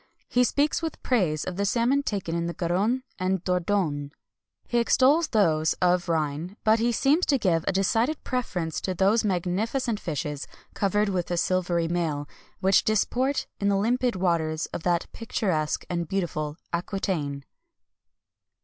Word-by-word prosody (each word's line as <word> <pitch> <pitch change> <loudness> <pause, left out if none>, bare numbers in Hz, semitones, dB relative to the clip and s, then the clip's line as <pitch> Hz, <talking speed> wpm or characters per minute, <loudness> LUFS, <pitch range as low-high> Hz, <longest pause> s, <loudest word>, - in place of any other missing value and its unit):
He 250 - +3
speaks 285 +6 +1
with 325 -2 -5
praise 180 - +1
of 185 -1 -5
the 200 - 0
salmon 240 +6 +2
taken 200 -10 -3
in 170 0 -1
the 170 - -4
Garonne 205 +8 0 0.2
and 185 0 0
Dordogne. 180 -6 0 0.6
He 240 - +1
extols 275 +7 +4
those 160 -8 +2
of 180 0 +1
the - - 0
Rhine, 160 +5 -2
but 220 +1 +4
he 235 +1 +2
seems 280 +9 +2
to 280 - +3
give 175 -8 +1
a - - +3
decided 225 +10 +1
preference 180 - -2
to 185 - -2
those 200 +5 +3
magnificent 210 +5 -1
fishes 150 -2 -4 0.3
covered 205 +1 +1
with 180 -3 -2
a 175 - -1
silvery 175 -1 +1
mail, 160 -4 -1 0.3
which 190 +1 +4
disport 250 +6 +1
in 200 - +1
the 200 - +2
limpid 240 +3 +1
waters 165 -4 0
of - - -3
that 175 0 +1
picturesque 180 -9 -1
and 170 -2 -2
beautiful 155 -5 -2 0.2
Aquitaine. 170 -6 -2
185 Hz, 155 wpm, -26 LUFS, 170-225 Hz, 0.6 s, extols